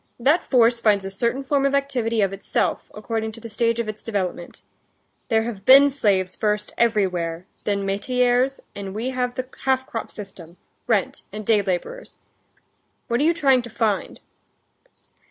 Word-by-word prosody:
That 290 +8 +3
force 235 -2 +3
finds 205 -4 +2
a 195 - -5
certain 235 +7 -1
form 275 0 +1
of 275 0 +2
activity 245 -5 0
of 195 0 0
itself, 195 - -2
according 220 +1 -3
to 230 - -11
the 230 - -8
stage 230 +1 0
of 230 - -1
its 215 0 -6
development. 185 -5 -4 0.6
There 225 -1 +2
have 220 -4 -6
been 275 +4 +8
slaves 195 -8 +1
first 210 -1 -1
everywhere, 185 -7 0 0.2
then 200 -1 0
metayers; 250 +6 +1
and 195 -1 -7
we 240 +4 -2
have 250 -1 -2
the 255 0 -4 0.2
half 260 -1 +2
crop 225 - -5
system, 185 -4 -10 0.3
rent, 215 -5 0
and 210 +1 -7
day 215 -1 +4
laborers. 200 - -4 0.9
What 235 +1 +1
are - - +2
you 330 +2 +4
trying 270 -6 +4
to 240 - -9
find?" 215 -2 -1
225 Hz, 165 wpm, -23 LUFS, 200-255 Hz, 0.9 s, been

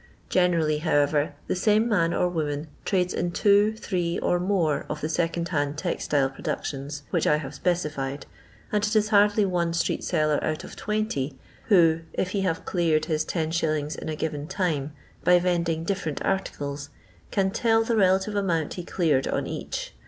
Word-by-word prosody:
Generally, 165 -4 +2
however, 145 -2 +1
the - - -1
same 215 +4 +3
man 170 -7 +2
or 180 - +1
woman 155 -3 -2 0.2
trades 180 -2 +1
in 175 - -1
two, 205 +3 +3
three, 175 -6 -2
or 175 - +1
more 175 -6 +1
of - - -3
the 150 - -2
second 170 +1 -1
hand 145 -2 -1
textile 150 -5 0
productions 140 +2 -5
which 170 - +1
I - - +5
have 145 -2 -6
specified, 145 -5 -2 0.5
and 210 -1 +1
it 215 +1 0
is 215 0 +3
hardly 205 0 +4
one 175 -3 0
street 170 - 0
seller 155 -1 +1
out 155 0 -2
of - - -10
20, 210 -11 -2 0.3
who 165 -6 +5
if 185 - -1
he 200 - 0
have 175 -4 -1
cleared 160 -4 +1
his 155 -1 0
10«. 155 -2 -1
in - - -5
a 155 - -2
given 150 -1 -3
time, 155 -7 -1 0.3
by 180 - +6
vend 175 -1 +1
ing 160 0 -1
different 165 -6 -2
articles, 145 -7 -2 0.4
cnn 190 -2 +1
tell 225 -2 +3
the 230 0 0
relative 190 0 +3
amount 175 -7 0
he 180 - -6
cleared 155 -7 +1
on - - -1
each. - - -5
170 Hz, 175 wpm, -26 LUFS, 150-190 Hz, 0.5 s, by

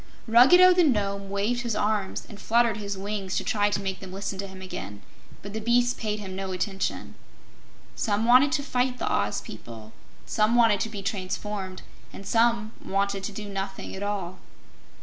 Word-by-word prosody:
Ruggedo 270 +11 +7
the 355 0 +4
Nome 200 -8 0
waved 205 +5 0
his 235 -3 -2
arms 210 -3 -1
and 205 - -11
fluttered 230 -1 +2
his 200 -2 -4
wings 195 -1 -3
to - - -1
try 205 -1 +1
to 205 - -1
make 190 -1 -3
them 190 -1 -9
listen 195 0 -5
to 195 - -3
him 190 0 -11
again, 105 - -7 0.4
but 200 - -8
the 220 - -2
beasts 240 +2 +2
paid 215 -2 -3
no 190 0 -5
attention. 195 +1 -3 0.8
Some 210 +1 0
wanted 255 +4 +6
to 285 - 0
fight 250 -2 0
the - - -3
Oz 100 +1 0
people, 110 0 -10 0.3
some 215 +2 +2
wanted 230 -4 +5
to 225 - -1
be 205 -2 -7
transformed, 190 -1 -4 0.3
and 195 - -10
some 230 0 +2
wanted 200 0 -1
to 210 - -4
do 210 +1 -7
nothing 195 -1 -5
at 190 - -7
all. 195 -3 -3
205 Hz, 180 wpm, -26 LUFS, 195-230 Hz, 0.8 s, Ruggedo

